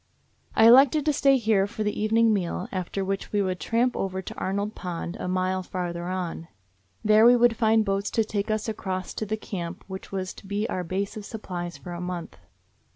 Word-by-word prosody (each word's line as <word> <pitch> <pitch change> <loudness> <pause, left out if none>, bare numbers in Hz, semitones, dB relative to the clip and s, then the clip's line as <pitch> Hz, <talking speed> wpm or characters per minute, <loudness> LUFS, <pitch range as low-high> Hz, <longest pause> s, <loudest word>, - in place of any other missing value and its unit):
I 220 - +6
elected 270 +5 +7
to 300 - +3
stay 275 -1 +4
here 215 -4 +2
for 215 - -4
the 210 0 -2
evening 225 +1 +4
meal, 180 -2 -2
after 190 +1 -3
which 195 0 -3
we 205 - +1
would 185 -1 -2
tramp 240 +2 +1
over 190 -1 -2
to 190 - -7
Arnold 200 +3 -2
Pond, 175 -2 -5
a - - -3
mile 185 +1 0
farther 175 -2 -4
on. 180 -3 -4 0.6
There 215 +1 +6
we 240 +1 +8
would 240 -1 +4
find 220 -1 +3
boats 195 0 0
to 225 - +5
take 210 0 -3
us 215 +1 -1
across 190 -4 -4
to 215 - -4
the 215 +2 -1
camp 175 -4 -6
which 190 0 -8
was 190 -1 -3
to 195 - -14
be 205 +2 -1
our 185 -6 -2
base 195 +5 -3
of 210 - -7
supplies 180 -6 -6
for 180 - -9
a 175 - -6
month. 180 -1 -5
200 Hz, 210 wpm, -26 LUFS, 185-220 Hz, 0.6 s, we